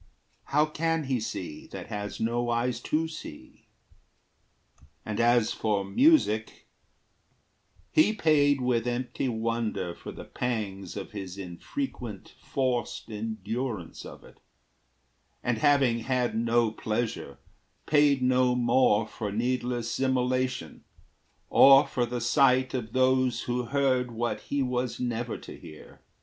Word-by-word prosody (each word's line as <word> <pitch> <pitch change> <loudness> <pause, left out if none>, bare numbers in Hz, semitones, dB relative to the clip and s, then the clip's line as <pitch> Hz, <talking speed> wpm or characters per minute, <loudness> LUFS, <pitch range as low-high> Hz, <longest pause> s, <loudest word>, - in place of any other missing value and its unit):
How 150 +2 +3
can 165 +1 -1
he 130 -3 -1
see 90 -7 -6
That - - -8
has 105 -2 -5
no 120 +1 0
eyes 120 0 0
to 155 +6 -1
see? 155 - -11 1.4
And 105 -1 -3
as 120 -1 +3
for 105 -3 -1
music, 110 - +2 1.3
He 315 -8 +5
paid 145 -8 +3
with 125 -2 +1
empty 125 +2 -2
wonder 110 -5 -2
for - - -9
the - - -9
pangs 100 -6 -4
Of - - -6
his 95 -2 -7
infrequent 100 - -6
forced 125 -4 -2
endurance 110 -1 -4
of - - -11
it; - - -17 1.0
And 120 -2 0
having 140 -5 +3
had 125 +1 0
no 115 0 +2
pleasure, 110 -9 -3 0.5
paid 145 -3 +3
no 125 0 +3
more 120 -3 +3
For 105 -1 -5
needless 120 +1 -1
immolation, 130 -1 -1 0.6
or 135 +1 +7
for 120 -1 -1
the 120 0 -3
sight 130 +1 +3
Of 115 -4 -4
those 130 -1 +2
who 125 0 -2
heard 130 -1 +1
what 120 0 -2
he 140 -1 -1
was 125 -1 -2
never 120 -1 -2
to - - -10
hear. 80 -3 -13
120 Hz, 125 wpm, -28 LUFS, 110-130 Hz, 1.4 s, or